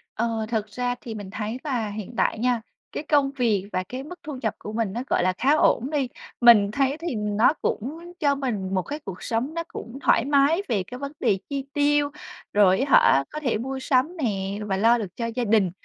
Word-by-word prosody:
Ờ, 225 -1 -1
thật 220 -3 0
ra 245 +3 -2
thì 225 -2 -7
mình 205 -2 -7
thấy 215 +3 -4
là 245 -8 -1
hiện 210 +2 -7
tại - - +1
nha, 245 -1 +1 0.3
cái - - -4
công 285 -3 +2
việc 225 -8 +1
và 185 - 0
cái 260 +2 -5
mức 355 +4 -10
thu 295 -4 -6
nhập 220 -3 0
của 210 - -7
mình 220 -4 -1
nó, 235 - -2
gọi - - +2
là, 185 0 +2
khá 275 +4 +3
ổn 260 -4 +3
đi. 290 -4 0 0.3
Mình 220 -4 +7
thấy 275 +4 +1
thì 335 -7 -3
nó 210 +6 +2
cũng 325 +10 -3
cho 285 -2 +3
mình 215 -9 -3
một 185 - +2
cái 295 - -6
cuộc 185 -2 -7
sống 245 +7 -1
nó 335 - -2
cũng 235 -5 -8
thoải 230 - +3
mái 285 +5 +3
về 210 -6 0
cái 250 - -9
vấn 280 +1 -5
đề 195 - +2
chi 275 -1 -3
tiêu, 290 0 +2 0.4
rồi 195 -2 +5
á 270 +1 -1 0.2
hả, 135 - +3
có 305 - -5
thể 260 -8 0
mua 265 +4 -4
sắm 265 +6 +1
nè 200 -8 -2
và 195 -2 -1
lo 230 +4 +5
được 200 -6 -6
cho 235 - -3
gia 230 +2 -2
đình. 210 -5 +3
240 Hz, 230 wpm, -25 LUFS, 210-280 Hz, 0.4 s, Mình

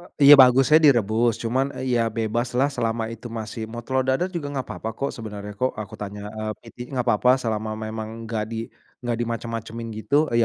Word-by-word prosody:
Eee, - - -15 0.2
iya 145 +1 +11
bagusnya 130 +4 +6
direbus 115 -3 +4
cuman, 130 +4 +1
eee, 130 -1 -2
ya - - +3
bebaslah 120 +4 0
selama 115 -3 -1
itu 115 +1 -8
masih 110 -1 -6
mau 120 0 -6
telor 130 +1 0
dadar 135 +8 +2
juga 160 -5 -3
nggak 135 -2 -4
papa 110 - -5
kok 140 - -1
sebenarnya 105 -2 -7
kok 130 0 +1
aku 105 -2 -7
tanya, 105 0 -6 0.2
eee, 110 0 -2
PT 115 - -15 0.2
nggak 125 -2 -1
papa 120 +3 +3
selama 110 -1 -2
memang 110 0 -5 0.2
nggak 110 -1 -2
di 115 - -3 0.5
nggak 120 -1 0
dimacem-macemin 115 0 -4
gitu, 135 - -3 0.2
eee, 115 - +3
115 Hz, 195 wpm, -24 LUFS, 110-130 Hz, 0.5 s, iya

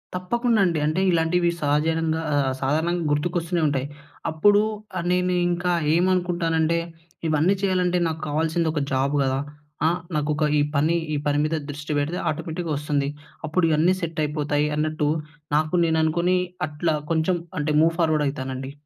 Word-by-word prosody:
తప్పకుండండి. 195 -2 +1
అంటే, 155 +5 +1
ఇలాంటివి 170 +1 +2
సహజనంగా 160 +2 +1
ఆహ్, 135 -2 +1
సాధారణంగా 160 +5 0
గుర్తుకొస్తూనే 170 +3 0
ఉంటాయి. 140 -1 -1 0.4
అప్పుడూ 205 +6 +4 0.4
ఆహ్, 175 - -3
నేను 180 0 +1 0.2
ఇంకా 175 0 0 0.2
ఏమనుకుంటానంటే, 170 -2 +1 0.5
ఇవన్నీ 155 +4 +3
చెయ్యాలంటే 180 -2 +1
నాకు 160 0 -4
కావాల్సింది 160 +2 0
ఒక 150 - -1
జాబ్ 135 +2 +1
గదా! 130 0 0 0.5
ఆహ్, 175 +2 +1 0.2
నాకొక 150 +1 0 0.2
ఈ - - +4
పని 155 +4 +2 0.2
ఈ - - 0
పని 145 0 +2
మీద 160 - 0
దృష్టి 145 +1 -6
పెడితే, 155 +5 -2
ఆటోమేటిక్‌గా 160 +1 -3
ఒస్తుంది. 145 -1 -1 0.4
అప్పుడు 165 +3 +1
ఇయన్నీ 165 +5 +3
సెట్టయిపోతాయి 150 -2 -1
అన్నట్టు, 155 -1 0 0.5
నాకు 155 +2 0
నేను 160 -1 +1
అనుకొనీ 170 +3 +2 0.3
అట్లా 155 +1 -1 0.2
కొంచం 165 +2 +1 0.2
అంటే, 150 +1 0
మూవ్ 165 +1 +3
ఫార్‌వర్డ్ 155 -2 +2
అయితానండి. 130 -1 -4
160 Hz, 140 wpm, -24 LUFS, 150-175 Hz, 0.5 s, అప్పుడూ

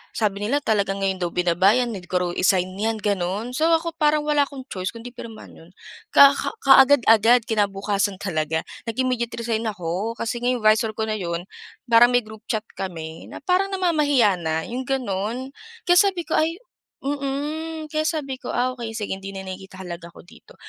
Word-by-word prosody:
sabi 205 -3 0
nila 285 +4 0
talaga 200 -4 +1
ngayon 195 -1 -1
daw 175 - 0
binaba 180 +4 +3
'yan, 245 -1 0
need 185 -4 -8
ko 185 - -5
raw 175 - -1
i-sign 185 +1 +1
'yan, 225 +2 0
gano'n. 200 +3 -1
So 310 +6 +1
ako 335 +1 -2
parang 300 0 +3
wala 295 -1 +2
akong 275 -2 -9
choice 185 -1 -4
kung 230 +2 -6
'di 245 - -8
pirmahan 230 -3 -10
'yon. 165 - -16 0.4
Ka 280 0 +8 0.3
kaagad-agad, 245 -4 +6
kinabukasan 200 -2 0
talaga 160 -4 -2 0.2
nag-immediate 235 0 -1
resign 230 -1 -2
ako. 195 +3 -3
Kasi 230 +2 -3
nga 245 - -2
yung 250 -3 0
visor 215 0 +3
ko 220 - -2
na 215 -1 -2
'yon, 170 -1 -3 0.4
parang 240 0 +5
may 245 - +3
group 220 0 -13
chat 220 -2 -1 0.2
kami, 165 -4 -6
na - - -10
parang 365 +4 +2
namamahiya 295 - +2
na, 160 -1 -1
yung 250 +5 -5
gano'n. 245 0 -2 0.3
Kaya 355 0 +4
sabi 385 -4 +2
ko - - -15
ay 330 +7 -1 0.4
mm, 295 +3 -3
kaya 310 0 0
sabi 275 -6 -3
ko, 250 - -5
"Ah 250 +1 +1
okey, 235 -3 -7
sige 205 -3 -4
hindi 195 0 -8
na 190 - -6
nakikita 190 0 -9
halaga 170 -1 -7
ko - - -13
dito." 175 - -18
225 Hz, 190 wpm, -23 LUFS, 195-270 Hz, 0.4 s, Ka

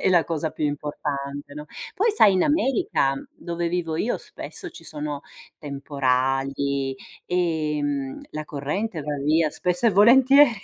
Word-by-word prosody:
è - - +2
la 175 -3 +5
cosa 160 -1 -2
più 150 - -3
importante, 145 -1 -4
no, 150 0 -7 0.3
poi 445 +4 +3
sai, 205 - +6
in 185 - +3
America, 295 - +2 0.2
dove 170 0 -3
vivo 165 -2 -2
io, 220 +8 0
spesso 350 -4 -7
ci - - -13
sono 150 -1 -5 0.4
temporali, 135 -1 -1 0.3
ehm, 150 -6 -1
la 155 0 -5
corrente 155 +7 -3
va 150 0 -3
via 155 +1 +3
spesso 180 +9 0
e - - +6
volentieri. 260 +7 +7
155 Hz, 140 wpm, -24 LUFS, 140-185 Hz, 0.4 s, volentieri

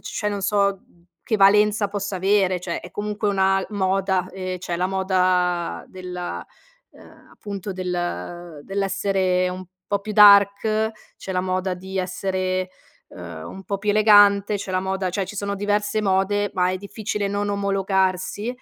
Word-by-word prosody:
cioè, 210 -1 -3
non 205 - -3
so 200 0 +1 0.5
che 220 - +2
valenza 210 +1 +4
possa 200 -1 -4
avere. 190 -1 +2
Cioè, 175 -1 -4
è 175 - -11
comunque 210 +3 -3
una 195 -1 +2
moda, 190 -1 0
ehm, 185 -1 -5
c'è 175 -1 -4
la 180 +1 0
moda 185 -2 0
della 180 -1 -6 0.5
uhm, - - -18
appunto, 200 -1 -6
del 175 -3 -4
dell'essere 195 -2 0
un 185 +1 -6 0.2
po' 200 - 0
più 210 +1 -6
dark, 210 +1 +6 0.3
c'è 190 - -6
la 185 - 0
moda 185 0 -1
di 190 +1 -6
essere, 185 0 -2 0.4
uhm, - - -9
un 195 - -9
po' 200 - -2
più 210 +1 0
elegante, 205 -1 +5
c'è 200 -1 -6
la 185 0 0
moda 190 -1 -2
Cioè, 195 +1 -2
ci 205 +2 -9
sono 200 0 -2
diverse 205 +1 0
mode, 200 +1 +1
ma 180 0 +2
è 185 - -2
difficile 205 +1 -4
non 205 +1 -1
omologarsi, 195 +1 0
195 Hz, 155 wpm, -22 LUFS, 185-205 Hz, 0.5 s, dark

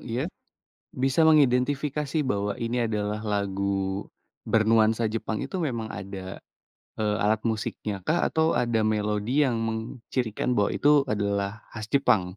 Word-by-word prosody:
iya? 120 +4 -2 0.7
Bisa 135 +5 +3
mengidentifikasi 145 +1 +2
bahwa 100 -6 -1
ini 120 +1 0
adalah 105 -1 -2
lagu 100 -1 -1 0.4
bernuansa 110 0 +3
Jepang 110 0 -3
itu 140 +8 -4
memang 120 -9 -2
ada, 95 -2 -7 0.6
eee, 105 -1 +1
alat 110 +1 +2
musiknya 110 -2 -2
kah 170 +2 +2
atau 160 0 +2
ada 120 -2 +1
melodi 105 +6 +1
yang 120 -4 0
mengcirikan 115 +1 -2
bahwa 100 - +2
itu 145 -1 +4
adalah 100 0 -1
khas 110 -1 -5
Jepang? 125 -8 +4
110 Hz, 125 wpm, -26 LUFS, 105-130 Hz, 0.7 s, itu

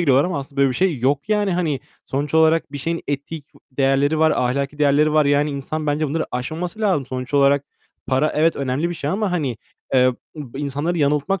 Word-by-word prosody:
giriyorlar 140 -4 +4
ama 175 -5 -2
aslında 140 0 -9
böyle 140 - +5
bir - - -3
şey 180 -7 +1
yok 140 - 0
yani. 205 -3 +1
Hani 155 -7 -1 0.3
sonuç 145 +3 -3
olarak 160 -2 +3
bir 145 - -5
şeyin 165 +4 -2
etik 145 +2 -4 0.3
değerleri 135 +3 +2
var. 160 0 +4
Ahlaki 140 +3 -1
değerleri 150 +1 +3
var. 155 -1 +4
Yani 145 +1 +2
insan 150 +2 -4
bence 150 +1 0
bunları 160 +3 -1
aşmaması 160 - -4
lazım. 185 - +1
Sonuç 130 +2 -5
olarak 140 0 +4 0.4
para 135 +3 +1
evet, 160 +2 +2
önemli 140 +4 -1
bir 175 - -4
şey 150 -2 -3
ama 205 0 -1
hani, 140 -10 -1 0.4
eee, 130 -1 +5 0.2
b 140 -4 -8
insanları 145 +4 -2
yanıltmak 150 +6 +1
145 Hz, 200 wpm, -21 LUFS, 140-160 Hz, 0.4 s, böyle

